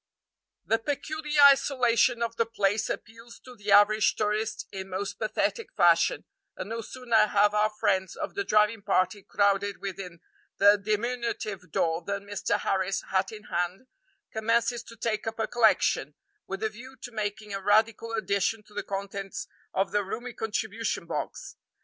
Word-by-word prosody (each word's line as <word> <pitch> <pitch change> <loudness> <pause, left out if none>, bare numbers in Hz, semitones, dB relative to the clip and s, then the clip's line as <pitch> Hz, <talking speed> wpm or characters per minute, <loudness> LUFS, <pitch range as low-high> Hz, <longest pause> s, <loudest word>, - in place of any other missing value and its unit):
The 225 - +2
peculiar 300 +3 -1
isolation 250 -4 +4
of 230 0 -3
the 230 - +1
place 210 -2 0
appeals 230 +2 -7
to 250 -1 -13
the 205 -2 -4
average 215 +1 +5
tourist 215 +1 -1
in 190 -1 -6
most 195 +2 -4
pathetic 340 - -1
fashion, - - +4 0.3
and - - -6
no 230 0 -3
sooner 235 -1 +2
have 205 0 +3
our 210 0 +3
friends 190 -3 0
of - - -5
the 200 - -2
driving 210 +2 +2
party 195 0 +1
crowded 200 0 +1
within 185 -3 -7 0.4
the 205 +1 +7
diminutive 215 -3 -3
door 165 +2 0
than 200 +3 -4
Mr. 205 -1 -1
Harris, 190 -1 0
hat 190 0 +1
in 215 -1 -10
hand, 180 +5 -3 0.5
commences 230 +2 +1
to 230 - -12
take 220 -1 -2
up 225 - -3
a 225 - 0
collection, 230 -3 +2 0.3
with 195 +2 -5
a 220 - +1
view 255 +5 -12
to 245 - -7
making 210 -1 -4
a 195 - -3
radical 220 +3 +2
addition 215 0 0
to 210 - -21
the 205 - -2
contents 195 0 -5 0.3
of 195 +1 0
the 205 0 +1
roomy 240 +5 -6
contribution 220 0 -3
box. - - -5
210 Hz, 160 wpm, -27 LUFS, 200-230 Hz, 0.5 s, the